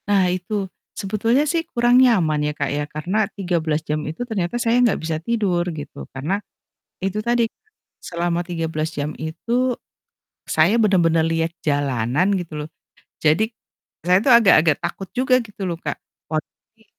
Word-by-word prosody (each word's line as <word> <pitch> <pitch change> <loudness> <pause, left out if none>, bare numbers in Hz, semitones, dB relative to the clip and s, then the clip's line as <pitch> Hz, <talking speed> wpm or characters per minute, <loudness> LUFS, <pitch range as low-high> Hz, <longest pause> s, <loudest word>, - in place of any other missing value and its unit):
Nah 200 -2 +4
itu. 195 +2 -2 0.3
Sebetulnya 220 +6 +1
sih 335 0 +1
kurang 240 +1 +4
nyaman 180 -12 +3
ya, 150 - 0
Kak, 140 -1 -2
ya 150 - 0
karena 175 +9 -1
13 165 -5 0
jam 150 0 -1
itu 160 +9 -6
ternyata 200 -3 -2
saya 230 -1 +2
enggak 235 - +2
bisa 160 0 -2
tidur 195 -6 0
gitu 150 -2 -8
karena 145 +9 -1 0.7
itu 195 +2 -1
tadi 235 0 +2 0.6
selama 170 0 -1
13 165 -3 -2
jam 145 +1 -2
itu 235 +11 -1 0.7
saya 160 +7 +4
bener-bener 170 -6 +3
lihat 165 0 0 0.2
jalanan 145 - +1
gitu 170 -3 -7
loh. - - -12 0.5
Jadi 160 +9 +3 0.6
saya 180 +1 +5
tuh 260 - +6
agak-agak 170 -8 +5
takut 175 +2 -4
juga 255 0 +3
gitu 210 -3 -9
loh, 170 - -3
Kak, - - -3 0.3
"Waduh 155 -1 -3 0.2
ini 220 - -25
175 Hz, 150 wpm, -21 LUFS, 155-220 Hz, 0.7 s, tuh